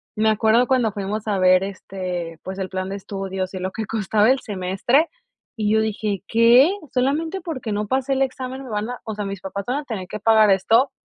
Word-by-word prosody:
me 220 0 +2
acuerdo 220 +3 +3
cuando 245 -5 +2
fuimos 205 +2 -4
a 200 -2 0
ver 185 0 +5
este, 180 -4 -5
pues 190 +1 -6
el 190 - -2
plan 185 0 -3
de 200 - -4
estudios 190 -1 -5
y 185 - -4
lo 185 +1 -3
que 220 -1 -4
costaba 215 +1 +1
el 265 +1 +3
semestre 205 - +1 0.5
y 210 -2 0
yo 220 - +4
dije: 210 -2 -2
"¿Qué? 235 +8 +6 0.2
¿Solamente 315 +8 0
porque 265 -10 -5
no 210 +1 -2
pasé 265 +3 0
el 265 - 0
examen 260 0 -3
me 255 - -9
van 210 +2 -2
a 245 - -5
o 220 - -5
sea, 210 -1 -4
mis 195 -1 -5
papás 195 +1 -5
van 255 +5 -1
a 295 - -3
tener 200 -7 -5
que 210 - -6
pagar 220 -1 +5
esto?". 225 +8 +3
215 Hz, 225 wpm, -22 LUFS, 195-245 Hz, 0.5 s, Qué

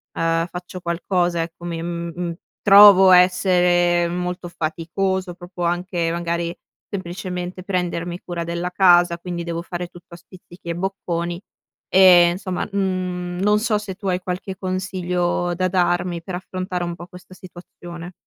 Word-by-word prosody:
ehm, 165 0 +1
faccio 180 0 -8
qualcosa, 175 0 0
ecco, 170 +1 -10
mi 165 -1 -4
mhmm 170 0 -4 0.3
trovo 195 -1 +9
essere 180 -1 +4
molto 180 0 -4
faticoso 175 +3 -2
proprio 175 0 -8
anche 175 -1 -1
magari 170 0 -2 0.4
semplicemente 180 -1 -5
prendermi 175 -2 -2
cura 170 -1 -5
della 170 +1 -3
casa, 175 -2 +4
quindi 175 -1 -5
devo 170 0 -3
fare 175 0 -5
tutto 175 -1 -14
a - - -12
spizzichi 175 0 -16
e 170 - -2
bocconi 175 -2 -3 0.5
e 180 -2 +7
insomma, 185 -1 -3
n 180 -2 -2
non 210 +1 +3
so 215 -1 +1
se 205 -3 -6
tu 200 0 -7
hai 180 - 0
qualche 185 +1 -5
consiglio 180 -2 -2
da 185 +1 0
darmi 175 -1 0
per 185 - -5
affrontare 185 0 -4
un 175 - -4
po' 175 0 -10
questa 180 +1 -14
situazione. 175 -1 -11
180 Hz, 145 wpm, -21 LUFS, 170-185 Hz, 0.5 s, trovo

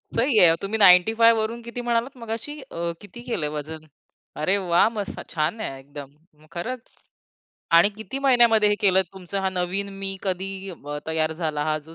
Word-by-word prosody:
सही 235 -1 +2
आहे. 165 -2 +7
तुम्ही 205 +3 -2
95 220 +4 +6
वरून 230 +2 -4
किती 235 +1 -6
म्हणालात 240 +2 -1
मगाशी 230 +6 -6
अ, 170 -10 -4
किती 205 +4 -12
केलं 175 -12 -2
वजन 155 +1 -7 0.6
अरे 185 +6 +2
वाह! 180 0 +3
मस्त 210 -3 -6
छान 160 +7 -1
आहे 135 -9 -5
एकदम, 140 0 -11 0.4
खरंच 230 +8 -6 0.8
आणि 170 +4 +7
किती 265 +5 -6
महिन्यामध्ये 235 -6 +4
हे 205 - +2
केलत 190 -1 +3
तुमचा 190 +1 -5
हा 190 - 0
नवीन 185 +2 -2
मी 195 0 -3
कधी 190 0 -2 0.2
अ, 145 -3 -7
तयार 160 0 -1
झाला? 155 -3 -3
हा 155 0 0
जो 160 +2 -14
195 Hz, 170 wpm, -23 LUFS, 165-230 Hz, 0.8 s, आहे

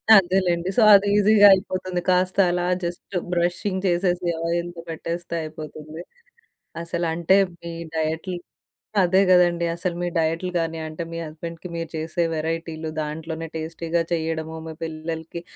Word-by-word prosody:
అదేలెండి. 180 -2 +3
సో, - - +6
అది 200 +1 +4
ఈజీగా 205 0 +7
అయిపోతుంది. 185 -2 -1
కాస్త 185 0 +2
అలా 175 0 0 0.2
జస్ట్ 175 +3 -5 0.2
బ్రషింగ్ 175 +2 0
చేసేసి 175 0 +1 0.2
ఆయిల్‌లో 170 0 -2
పెట్టేస్తే 170 +1 -4
అయిపోతుంది. 155 0 -8 0.8
అసలు 170 0 -2
అంటే, 170 +3 +3 0.3
మీ 170 0 -6 0.2
డైట్‌లు 160 +3 -2 0.7
అదే 185 +1 +4
కదండీ. 175 -1 +4
అసలు 175 0 -2
మీ 175 - 0
డైట్‌లు 165 +3 0
కాని 165 -1 -2
అంటే, 155 +2 -6
మీ 165 - -4
హస్బెండ్‌కీ 165 +3 -8
మీరు 165 -1 -4
చేసే 160 +2 -1
వెరైటీలు, 160 0 -3
దాంట్లోనే 160 +2 -5
టేస్టీగా 165 +1 -2
చేయడము. 160 -1 -2
మీ 160 - -6
పిల్లలకి 160 +1 -5
170 Hz, 130 wpm, -23 LUFS, 160-180 Hz, 0.8 s, ఈజీగా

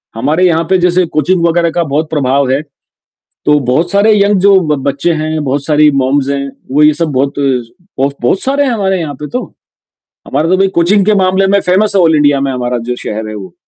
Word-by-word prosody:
हमारे 150 +10 0
यहाँ 165 -1 +1
पे 190 - +3
जैसे 180 0 +1
कोचिंग 170 +2 +1
वगैरह 170 0 +1
का 170 +1 -1
बहुत 155 +1 -2
प्रभाव 140 -2 0
है, 135 - 0 0.8
तो 150 0 +3
बहुत 165 +7 0
सारे 205 +2 +3
यंग 200 -1 +2
जो 195 0 +5 0.2
बच्चे 140 +5 -1
हैं, 155 -1 -3
बहुत 140 +1 -2
सारी 150 -1 +3
मॉम्स 135 +1 0
हैं, 140 0 -2 0.2
वो 150 +2 +3
ये 150 0 +5
सब 155 0 -2
बहुत 140 +2 -1
ब 140 - -3
बहुत 125 +11 0
सारे 280 +2 0
हैं 255 - 0
हमारे 190 -4 -1
यहाँ 155 -3 -4
पे 150 +2 -7
तो, 250 +1 -4 0.8
हमारा 160 +3 -1
तो 185 - +2
भाई 195 +1 +2
कोचिंग 190 +4 +3
के 215 - +3
मामले 190 0 +1
में 200 +1 +3
फेमस 200 +3 +1
है 195 - +4
ऑल 160 -2 +3
इंडिया 145 -1 +2
में 135 -1 -1
हमारा 125 -1 -2
जो 125 - -1
शहर 110 -2 -6
है 110 - -7
वो। 95 -4 -9
155 Hz, 220 wpm, -12 LUFS, 140-185 Hz, 0.8 s, जो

